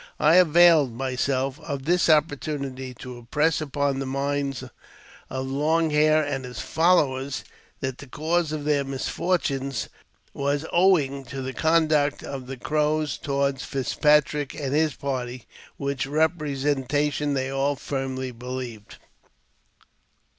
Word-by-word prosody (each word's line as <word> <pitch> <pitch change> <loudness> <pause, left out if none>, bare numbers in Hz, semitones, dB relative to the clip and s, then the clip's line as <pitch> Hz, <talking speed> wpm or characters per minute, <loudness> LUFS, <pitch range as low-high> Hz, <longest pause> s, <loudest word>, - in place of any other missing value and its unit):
I 155 +3 +5
availed 165 -6 +6
myself 130 +1 -1
of 140 -2 -5
this 175 +2 +3
oppor 155 -1 +4
tunity 135 -4 -5
to 125 -1 -8
impress 150 +7 +1
upon 140 -2 -1
the 135 - -3
minds 140 -1 -2 0.7
of 130 0 -3
Long 155 +4 +1
Hair 155 +1 +4
and 140 -2 -3
his 125 -3 -7
followers 140 -5 +1 0.4
that 130 -1 -3
the 145 - -10
cause 160 +4 0
of 155 -1 -3
their 145 -2 +2
misfortune 140 0 -1 0.6
was 140 +2 -1
owing 160 -7 +3
to 135 +2 -6
the 130 0 -4
jonduct 155 -2 +2
of 135 -2 -6
the 135 0 -6
Crows 150 +2 0
toward 140 -1 -1
Fitzpatrick 150 +2 +1
and 140 -3 -3
his 155 0 +2
party, 125 -3 -4 0.3
which 140 -1 -2
'epresentation 145 -2 0
they 130 0 -1
all 135 +1 0
firmly 130 -1 -4
believed. 125 -3 -7
140 Hz, 125 wpm, -25 LUFS, 130-150 Hz, 0.7 s, availed